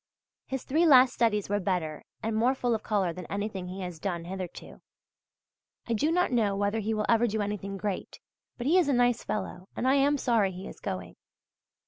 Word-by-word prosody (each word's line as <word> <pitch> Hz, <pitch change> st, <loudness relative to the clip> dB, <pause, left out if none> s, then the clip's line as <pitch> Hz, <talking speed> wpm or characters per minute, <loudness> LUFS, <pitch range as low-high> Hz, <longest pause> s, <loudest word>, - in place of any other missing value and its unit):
His 265 Hz, -1 st, -3 dB
three 325 Hz, +5 st, +2 dB
last 255 Hz, -3 st, +7 dB
studies 210 Hz, -4 st, +1 dB
were 205 Hz, +1 st, 0 dB
better 175 Hz, -6 st, -2 dB, 0.2 s
and 220 Hz, 0 st, -1 dB
more 245 Hz, +4 st, +3 dB
full 245 Hz, -2 st, 0 dB
of 220 Hz, -, -1 dB
colour 195 Hz, -6 st, 0 dB
than 180 Hz, +1 st, -8 dB
anything 200 Hz, -2 st, -4 dB
he 185 Hz, +2 st, -6 dB
has 180 Hz, -3 st, -6 dB
done 170 Hz, -2 st, -3 dB
hitherto. 185 Hz, -1 st, -7 dB, 1.1 s
I 235 Hz, -, 0 dB
do 295 Hz, +8 st, +1 dB
not 360 Hz, -2 st, +2 dB
know 215 Hz, -5 st, +2 dB
whether 205 Hz, +2 st, 0 dB
he 220 Hz, +1 st, -2 dB
will 210 Hz, 0 st, 0 dB
ever 235 Hz, +1 st, +4 dB
do 220 Hz, 0 st, -2 dB
anything 200 Hz, -1 st, -3 dB
great, 200 Hz, -1 st, -4 dB, 0.4 s
but 240 Hz, -, -5 dB
he 340 Hz, +7 st, +5 dB
is 345 Hz, -, +2 dB
a -, -, +3 dB
nice 245 Hz, -1 st, +2 dB
fellow, 185 Hz, -3 st, -4 dB
and 255 Hz, -, -1 dB
I 265 Hz, -, +5 dB
am 280 Hz, +1 st, +3 dB
sorry 225 Hz, -7 st, +2 dB
he 185 Hz, +2 st, -7 dB
is -, -, -10 dB
going. 90 Hz, -1 st, -5 dB
210 Hz, 205 wpm, -28 LUFS, 190-245 Hz, 1.1 s, last